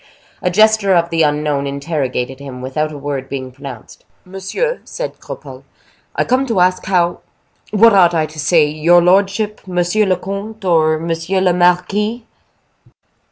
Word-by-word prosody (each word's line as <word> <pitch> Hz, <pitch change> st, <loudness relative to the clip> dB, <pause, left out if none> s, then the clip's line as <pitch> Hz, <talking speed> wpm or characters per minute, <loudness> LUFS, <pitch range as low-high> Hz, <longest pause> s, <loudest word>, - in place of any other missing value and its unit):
A 180 Hz, -, +1 dB
gesture 215 Hz, 0 st, +3 dB
of 170 Hz, 0 st, +1 dB
the 165 Hz, -1 st, +1 dB
unknown 150 Hz, -2 st, 0 dB
interrogated 140 Hz, -3 st, -3 dB
him, 135 Hz, -2 st, -9 dB
without 150 Hz, +4 st, -2 dB
a 150 Hz, -, -8 dB
word 140 Hz, -2 st, -5 dB
being 130 Hz, -2 st, -5 dB
pronounced. 130 Hz, -3 st, -11 dB, 0.2 s
"Monsieur," 195 Hz, -, -3 dB
said -, -, -6 dB
Cropole, -, -, -10 dB, 0.5 s
"I -, -, +1 dB
come 260 Hz, +2 st, 0 dB
to 225 Hz, -6 st, 0 dB
ask 185 Hz, +1 st, +2 dB
how—what 195 Hz, +4 st, 0 dB
ought 175 Hz, -3 st, +5 dB
I 160 Hz, -1 st, +1 dB
to 155 Hz, 0 st, -11 dB
say: 155 Hz, +1 st, +3 dB
your 155 Hz, +4 st, +3 dB
lordship, 200 Hz, +3 st, +1 dB
monsieur 180 Hz, +4 st, +1 dB
le 185 Hz, -, +3 dB
comte, 200 Hz, +3 st, -7 dB
or 160 Hz, -3 st, +3 dB
monsieur 165 Hz, +3 st, -2 dB
le 185 Hz, -1 st, +2 dB
marquis?" 195 Hz, +6 st, +1 dB
175 Hz, 150 wpm, -17 LUFS, 150-195 Hz, 0.5 s, ought